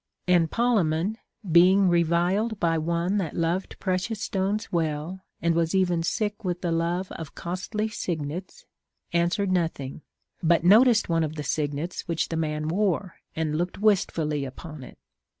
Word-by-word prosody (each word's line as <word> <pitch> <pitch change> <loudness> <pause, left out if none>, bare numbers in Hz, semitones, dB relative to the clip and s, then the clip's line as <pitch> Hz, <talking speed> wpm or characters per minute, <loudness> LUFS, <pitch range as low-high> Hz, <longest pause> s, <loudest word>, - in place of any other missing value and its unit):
And 175 -3 +4
Polemon, 205 -4 +1 0.3
being 185 +3 +6
reviled 175 +6 +2
by 165 -1 +2
one 170 +5 0
that 170 -6 -3
loved 170 +3 -1
precious 190 +3 -1
stones 205 +1 -2
well 160 +2 -2 0.2
and 170 0 +3
was 165 +2 +1
even 180 -3 +2
sick 210 +4 -2
with 180 -2 -2
the 175 - -1
love 170 +3 -1
of 160 -3 -8
costly 190 +5 -3
signets, 180 - -5 0.5
answered 175 +3 +1
nothing, 160 -6 -2 0.4
but 170 -1 +3
noticed 220 +5 +6
one 165 -1 +1
of 155 0 -3
the 150 - -4
signets 150 +4 -2
which 165 -2 -1
the 165 - -2
man 155 -1 -1
wore, 185 0 0 0.2
and 155 -1 -1
looked 175 +1 -2
Avistfully 165 -8 +1
upon 150 +3 -8
it. 125 - -12
170 Hz, 150 wpm, -26 LUFS, 160-190 Hz, 0.5 s, being